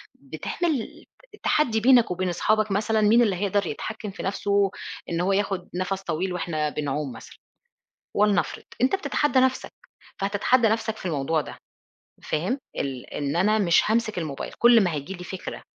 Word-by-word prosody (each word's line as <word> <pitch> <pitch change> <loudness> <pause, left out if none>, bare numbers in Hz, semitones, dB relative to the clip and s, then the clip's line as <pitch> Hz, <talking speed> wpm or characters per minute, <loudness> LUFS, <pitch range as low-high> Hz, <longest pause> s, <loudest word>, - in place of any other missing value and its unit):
بتعمل 315 -2 -4 0.3
ت - - -17
تحدّي 235 -8 +2
بينك 240 -2 +5
وبين 185 +1 -1
أصحابك 215 +4 +1
مثلًا 215 +2 +1
مين 220 +3 +5
اللي 205 -5 +2
هيقدر 200 0 0
يتحكم 215 +7 -5
في - - -8
نَفسه، 200 0 +1 0.4
إن 170 0 -1
هو 195 +2 +1
ياخد 195 -2 -1
نَفَس 185 +1 -2
طويل 180 +2 -2
وإحنا 155 -3 -1
بنعوم 145 -2 -3
مثلًا، - - -12 0.8
ولنفرض، 205 -2 +1 0.2
أنت 265 +9 +3
بتتحدى 295 -8 +1
نَفسك. 260 0 +1 0.5
فهتتحدى 210 +5 +2
نَفسك 220 0 -1
في - - -10
الموضوع 155 -1 0
ده - - -10 0.7
فاهم؟ 185 - -1 0.2
ال 130 -3 -4
إن 145 +2 -2
أنا 210 +4 +3
مش 180 +1 +3
هامسك 220 -3 +1
الموبايل 150 -5 -4
كل 235 -1 +7
ما 175 - 0
هييجي 150 +5 -5
لي 180 -1 -8
فكرة 185 +2 -7
195 Hz, 160 wpm, -25 LUFS, 175-220 Hz, 0.8 s, كل